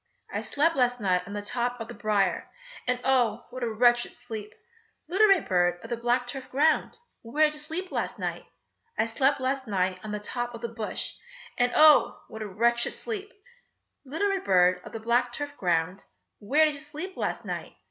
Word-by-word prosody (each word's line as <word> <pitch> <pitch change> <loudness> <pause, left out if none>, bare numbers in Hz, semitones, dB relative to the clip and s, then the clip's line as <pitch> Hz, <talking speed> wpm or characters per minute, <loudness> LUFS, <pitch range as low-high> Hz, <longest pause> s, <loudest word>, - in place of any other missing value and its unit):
I - - -1
slept 325 +3 +1
last 245 -1 +2
night 185 -4 +2
on 200 - -7
the 205 0 -4
top 245 +2 -2
of 225 - -5
the - - -8
briar, 205 -4 0 0.4
And 250 0 +1
oh! 245 -4 +2
what 255 +1 -7
a 235 -2 -1
wretched 240 +2 +3
sleep! 225 -4 -7 0.6
Little 390 +6 +4
red 390 -3 +4
bird 175 -1 +2
of 230 - -9
the - - +1
black 240 +1 +1
turf 255 +1 -6
ground, 310 - +2 0.2
Where 295 +7 +2
did 300 - 0
you 305 - -6
sleep 330 +5 -5
last - - -2
night? - - -4 0.5
I - - +3
slept 265 +5 +1
last 265 0 -1
night 185 -2 0
on 215 - -6
the 210 - -2
top 240 +3 -4
of 230 - -9
the 235 - -3
bush, 220 -2 -3 0.4
And 245 0 +2
oh! 305 -1 +6
what 220 - -8
a 215 - -3
wretched 235 +4 +1
sleep! 420 -2 -5 0.7
Little 320 +9 -1
red 390 -1 -1
bird 180 -1 +4
of - - -10
the 225 - -5
black 240 +2 +1
turf 290 +2 -4
ground, 180 - 0 0.3
Where 290 +10 +4
did 305 - +1
you 285 - -6
sleep 305 +6 -5
last - - -3
night? - - -5
245 Hz, 200 wpm, -27 LUFS, 215-290 Hz, 0.7 s, oh